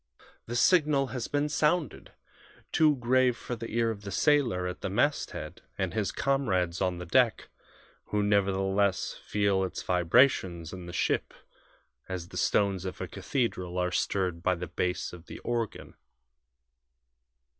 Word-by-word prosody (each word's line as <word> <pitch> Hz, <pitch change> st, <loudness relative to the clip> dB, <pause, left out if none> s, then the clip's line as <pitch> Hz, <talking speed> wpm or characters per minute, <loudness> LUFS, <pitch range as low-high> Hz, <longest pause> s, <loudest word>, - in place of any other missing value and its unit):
The 120 Hz, -, -4 dB
signal 150 Hz, -2 st, +4 dB
has 125 Hz, -3 st, -3 dB
been 145 Hz, +1 st, 0 dB
sounded 150 Hz, -, 0 dB, 0.6 s
too 155 Hz, -2 st, +4 dB
grave 125 Hz, 0 st, +2 dB
for 120 Hz, -, -5 dB
the 115 Hz, 0 st, -7 dB
ear 115 Hz, 0 st, +1 dB
of 105 Hz, -2 st, -7 dB
the 100 Hz, -, -7 dB
sailor 120 Hz, -5 st, +2 dB
at 90 Hz, 0 st, -5 dB
the -, -, -2 dB
masthead -, -, -1 dB, 0.2 s
and 95 Hz, -3 st, -2 dB
his 105 Hz, -2 st, -1 dB
comrades 95 Hz, -11 st, 0 dB
on 90 Hz, -2 st, 0 dB
the 90 Hz, -, -6 dB
deck 120 Hz, +5 st, +2 dB, 0.6 s
who 105 Hz, 0 st, 0 dB
nevertheless 100 Hz, -1 st, +1 dB
feel 100 Hz, -2 st, +1 dB
its 95 Hz, -, -4 dB
vibrations 90 Hz, -, +2 dB
in 90 Hz, -2 st, -8 dB
the -, -, -6 dB
ship -, -, -1 dB, 0.7 s
as 90 Hz, -2 st, -5 dB
the -, -, -8 dB
stones 100 Hz, -3 st, +1 dB
of 95 Hz, -, -6 dB
a -, -, -4 dB
cathedral 90 Hz, -9 st, -2 dB
are 90 Hz, 0 st, 0 dB
stirred 90 Hz, -3 st, -1 dB
by 90 Hz, +1 st, +2 dB
the 90 Hz, +1 st, -5 dB
bass 90 Hz, +2 st, -2 dB
of 85 Hz, -1 st, -12 dB
the -, -, -8 dB
organ. 115 Hz, -3 st, -3 dB
100 Hz, 150 wpm, -29 LUFS, 90-125 Hz, 0.7 s, signal